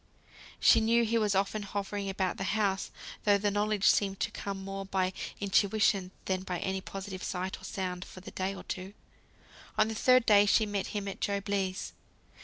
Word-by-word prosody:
She 230 - +6
knew 230 +1 +3
he 230 +1 +2
was 210 -2 +1
often 200 +2 0
hovering 200 0 -3
about 190 -1 -1
the - - -3
house; 195 -3 0 0.3
though 205 -1 +5
the 205 0 0
knowledge 210 0 0
seemed 195 -2 +3
to - - 0
come 195 -1 -5
more 195 0 -5
by 190 -1 0 0.3
intuition, 200 -1 +2 0.2
than 185 -1 0
by 180 -1 -3
any 190 +1 -2
positive 195 0 -7
sight 185 +1 -3
or - - -10
sound 180 -2 -3
for 185 - -11
the 185 - -10
first - - -29
day 190 +1 -1
or - - -9
two. 190 +2 -6 0.8
On 215 0 +4
the - - -2
third 255 +2 +4
day 205 -1 +6
she 220 +2 +4
met 205 -2 -2
him 205 -1 -4
at 195 - -6
Job 200 0 -1
Legh's. 195 -1 -2
200 Hz, 200 wpm, -30 LUFS, 190-205 Hz, 0.8 s, She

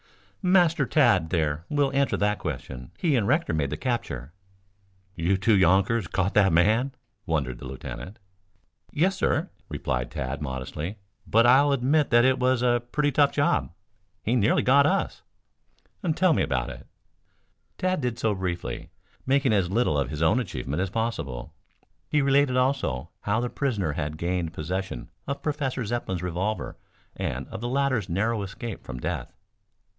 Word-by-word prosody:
"Master 180 -3 +4
Tad 110 - +3
there 80 -2 0
will 145 -2 +1
answer 140 0 +2
that 105 0 +1
question. 65 -5 -6
He 160 -6 +1
and 110 -5 +1
Rector 155 - +1
made 75 -3 0
the 75 - -3
capture." 80 - -3 0.8
"You 90 +1 +1
two 105 +3 +3
younkers 95 +3 +3
caught 95 +2 0
that 100 -3 +5
man?" 110 +11 +3 0.3
wondered 70 -7 -1
the - - -9
lieutenant. 65 - -7 0.7
"Yes, 185 +6 +2
sir," - - 0 0.2
replied 60 -1 -2
Tad 65 +3 -4
modestly. 75 +7 -4 0.3
"But 115 +2 +4
I'll 135 +4 +6
admit 140 +3 +2
that 120 +1 +5
it 130 0 +3
was 125 -1 +2
a 120 -1 +3
pretty 145 +1 +1
tough 140 +1 +4
job. 145 - +1 0.5
He 115 - +1
nearly 110 -2 +3
got 140 +2 +5
us." - - -1 0.9
"Tell 185 -2 +4
me - - +1
about 65 -2 -1
it." - - -11 0.9
Tad 185 -3 0
did 125 -3 -2
so 110 -2 +1
briefly, 90 -2 -4 0.4
making 135 -3 +3
as 95 -4 +2
little 95 -8 +2
of 70 - -1
his 75 +2 -2
own 95 +10 +4
achievement 70 - -3
as 95 - -1
possible. 100 - -3 0.6
He 150 -2 +2
related 135 -1 +3
also, 125 - 0
how 105 +2 0
the 120 0 -2
prisoner 110 - -1
had 75 0 -3
gained 85 -1 -2
possession 90 -4 -4 0.2
of 140 +1 -4
Professor 135 -5 -2
Zepplin's 100 -6 -3
revolver 90 +5 -2 0.4
and - - -3
of - - -7
the 120 - -2
latter's 130 -7 0
narrow 105 +5 0
escape 100 +3 -6
from 65 -2 -7
death. - - -4
105 Hz, 160 wpm, -26 LUFS, 80-130 Hz, 0.9 s, I'll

